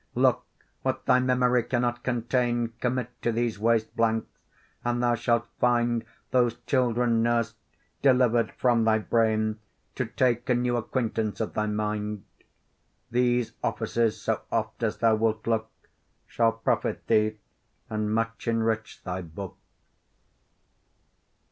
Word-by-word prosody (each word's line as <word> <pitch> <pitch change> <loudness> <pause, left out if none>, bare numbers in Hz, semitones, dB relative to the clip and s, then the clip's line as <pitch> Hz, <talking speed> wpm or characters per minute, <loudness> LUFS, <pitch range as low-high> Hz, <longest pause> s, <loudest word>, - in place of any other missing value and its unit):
Look! - - +3 0.4
what - - -2
thy 125 - +5
memory 125 -1 +3
cannot 120 0 -1
contain, 120 -1 0
Commit 125 -1 -1
to 120 - +1
these 115 -2 -1
waste 110 0 +1
blanks, 115 -1 +1 0.5
and 120 0 0
thou 120 0 +3
shalt 120 0 +1
find 120 -1 +2 0.3
Those 120 -2 +3
children 120 -3 +2
nursed, 115 -1 +1 0.5
deliver'd 125 -3 +3
from 120 -2 +3
thy 110 -1 +4
brain, 110 -1 +1 0.3
To - - -2
take 120 0 0
a 125 - +4
new 120 0 +1
acquaintance 110 -3 -2
of 110 - -2
thy 105 0 0
mind. 105 -1 -2 0.9
These 120 -1 +2
offices, 115 -2 0
so - - -1
oft - - -2
as - - 0
thou 115 -1 +4
wilt 110 0 0
look, 110 -1 0 0.6
Shall 115 -1 +2
profit 115 -1 -1
thee 110 -1 +2 0.5
and 110 -1 -2
much 115 +2 -2
enrich 115 -1 -1
thy 90 0 -3
book. 90 +3 -8
115 Hz, 130 wpm, -27 LUFS, 110-120 Hz, 0.9 s, thy